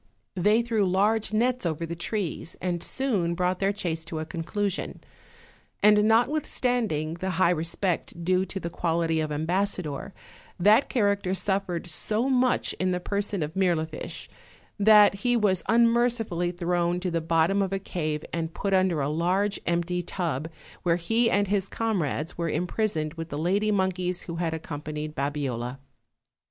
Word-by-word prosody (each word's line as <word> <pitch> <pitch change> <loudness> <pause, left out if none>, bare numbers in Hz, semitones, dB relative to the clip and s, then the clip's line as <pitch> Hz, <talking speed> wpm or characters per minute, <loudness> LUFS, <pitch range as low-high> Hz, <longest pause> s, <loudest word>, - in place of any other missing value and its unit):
They 210 +5 +3
threw 230 -3 +1
large 210 +4 +2
nets 245 +3 +1
over 165 -1 -2
the 170 +1 -5
trees, 175 -2 -3
and 175 -2 -2
soon 200 -12 -1
brought 180 +1 0
their 195 0 +2
chase 170 -5 -3
to 165 -1 -5
a 155 - -3
conclusion; 190 +4 -3 0.8
and 210 0 +6
notwithstanding 235 - +1
the 190 - -2
high 180 -2 +4
respect 170 +1 -2
due 185 +1 +3
to 195 - -5
the 170 -2 -5
quality 165 -1 0
of 155 -1 -2
ambassador, 170 0 -1 0.5
that 210 +8 +5
character 200 -5 +1
suffered 190 -3 -1
so 215 - -2
much 255 -1 +2
in 185 - +1
the 180 -1 0
person 200 -1 -2
of 150 +1 -5
Mirlifiche 170 -4 -1 0.5
that 210 0 +7
he 245 +1 +2
was 195 -5 +2
unmerci 235 0 +3
fully 175 -1 -1
thrown 175 0 0
to 180 0 -2
the 165 0 0
bottom 165 +4 +2
of 195 -1 -1
a 195 - 0
cave 155 -5 -3
and 165 0 -3
put 200 -1 -1
under 185 -5 +2
a 135 - 0
large 180 +7 0
empty 175 +1 0
tub, 160 -4 -3 0.3
where 170 -2 +2
he 225 +7 +1
and 205 -1 +2
his 195 -1 0
comrades 175 - -1
were 170 -1 0
im 180 - 0
prisoned 170 -7 -1
with 165 0 -6
the 145 - -4
lady 195 +7 +1
monkeys 185 -2 0
who 170 -1 -6
had 170 -1 -1
accompanied 155 -1 -5
Babiola. 135 -4 -3
180 Hz, 160 wpm, -26 LUFS, 165-205 Hz, 0.8 s, that